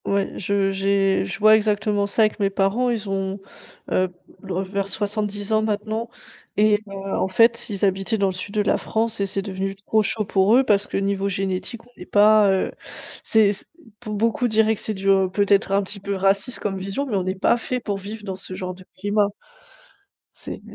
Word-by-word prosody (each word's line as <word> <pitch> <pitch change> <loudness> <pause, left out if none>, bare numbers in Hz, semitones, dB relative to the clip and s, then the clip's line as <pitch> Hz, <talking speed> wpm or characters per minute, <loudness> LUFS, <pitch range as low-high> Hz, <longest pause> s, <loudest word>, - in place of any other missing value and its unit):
Ouais, 200 0 +1
je 195 0 +1
j'ai 195 0 +1
je 185 - -5
vois 215 +1 +7
exactement 210 -1 +1
ça 220 +2 +2
avec 215 0 0
mes 200 -1 +2
parents. 200 +6 +1
Ils 220 -3 -2
ont, 195 0 -2 0.5
heu, 185 0 +2 0.3
vers 195 +1 -3
70 205 0 -2
ans 215 - +3
maintenant 220 +2 -2 0.5
et 210 0 +4
heu, - - -9 0.3
en - - +1
fait 230 +5 +3
ils 200 -1 0
habitaient 195 +3 0
dans 200 - +1
le - - 0
sud 190 +3 -7
de 210 - +3
la 205 - +2
France 225 0 -1
et 200 - +1
c'est 195 +1 -2
devenu 195 0 -4
trop 210 +2 +1
chaud 215 +1 -1
pour 195 +2 +3
eux 265 - +5
parce 205 -5 +2
que - - -3
niveau 195 0 0
génétique, 195 +4 -3
on - - -22
n'est 180 - -9
pas, 210 0 +5
heu, 190 - 0 0.5
c'est 215 -2 +4
p 205 - -12 0.3
pour 215 -3 -5
beaucoup 230 +5 +1
diraient 220 0 +3
que 215 - -8
c'est 215 - -3
du 195 0 -8 0.3
peut-être 200 0 +2
un 200 +1 +2
petit 200 +1 -7
peu 200 +1 -3
raciste 195 +5 +1
comme 195 -2 -2
vision, 195 +9 -3
mais 245 -7 -3
on 190 - +1
n'est 185 +1 -2
pas 200 +5 +2
fait 250 +2 -3
pour 205 -4 -3
vivre 210 +2 -8
dans 190 -2 -4
ce 185 -1 -6
genre 185 -1 -4
de 185 +1 -14
climat. 205 +1 +1 1.1
C'est - - -8
200 Hz, 210 wpm, -22 LUFS, 195-215 Hz, 1.1 s, vois